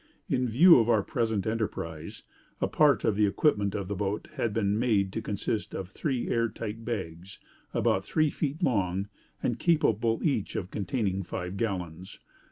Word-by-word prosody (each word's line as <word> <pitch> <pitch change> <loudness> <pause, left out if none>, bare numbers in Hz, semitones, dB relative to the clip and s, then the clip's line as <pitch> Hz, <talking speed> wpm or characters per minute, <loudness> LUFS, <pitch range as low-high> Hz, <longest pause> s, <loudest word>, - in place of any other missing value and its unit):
In 125 -2 0
view 165 +7 +7
of 115 0 +1
our 110 -4 +4
present 110 -4 -1
enterprise, 85 -8 -4 0.4
a - - +1
part - - +3
of 105 - +2
the 105 0 +3
equipment 100 -3 +1
of 100 -3 -3
the 100 - -2
boat 100 +1 -2
had 115 - -1
been 105 -1 0
made 100 -6 +1
to 115 - -2
consist 105 0 -3
of 95 -1 -5
three 130 -1 -2
air 115 0 +1
tight 115 0 -6
bags, 95 -5 -5 0.3
about 95 - +1
three 155 +7 +1
feet 150 +3 -3
long, 100 - 0 0.3
and 120 -1 0
capable 115 - +2
each 135 -10 0
of 90 - -4
containing 100 -1 -1
five 90 +1 -5
gallons. 95 -5 -4
105 Hz, 170 wpm, -28 LUFS, 95-120 Hz, 0.4 s, view